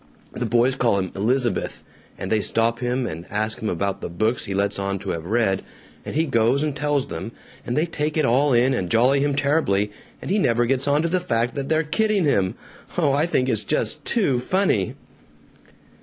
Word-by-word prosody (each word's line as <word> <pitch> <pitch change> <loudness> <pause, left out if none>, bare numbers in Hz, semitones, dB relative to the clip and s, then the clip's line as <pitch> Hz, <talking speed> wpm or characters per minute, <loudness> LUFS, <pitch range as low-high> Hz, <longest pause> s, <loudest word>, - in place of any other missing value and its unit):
The 120 - -3
boys 120 +3 +3
call 120 -5 +1
him 95 -2 -2
'Elizabeth,' 120 +2 -1 0.3
and 95 - -5
they 110 -1 +3
stop 115 +2 0
him 125 +1 -1
and 85 -3 -6
ask 110 +1 -1
about 100 -1 -2
the - - -4
books 110 +8 -1
he 100 -3 -4
lets 100 0 0
on 100 0 -1
to - - -4
have 80 -1 -4
read, 105 -3 +1 0.4
and - - -6
he 160 +2 +2
goes 125 +1 +2
and 150 -2 -2
tells 145 -2 0
them, 95 +8 -6 0.3
and 120 - -1
they 155 - +3
take 155 -2 -2
it 155 - +3
all 135 +5 +3
in 125 +2 +4
and 90 -8 -2
jolly 125 +6 +4
him 140 0 +1
terribly, 140 -9 +1 0.3
and - - -5
he 210 - +2
never 120 - +2
gets 135 +3 0
onto 150 +3 +2
the 180 +2 +1
fact 120 -8 -1
they're 155 +4 0
kidding 210 +5 +1
him. 95 -10 +1 0.4
Oh, 150 -6 +3
I 145 +4 +2
think 130 -6 +1
it's 110 -4 +1
just 150 0 0
TOO 165 - +2
funny!" 125 - 0
125 Hz, 200 wpm, -23 LUFS, 105-145 Hz, 0.4 s, in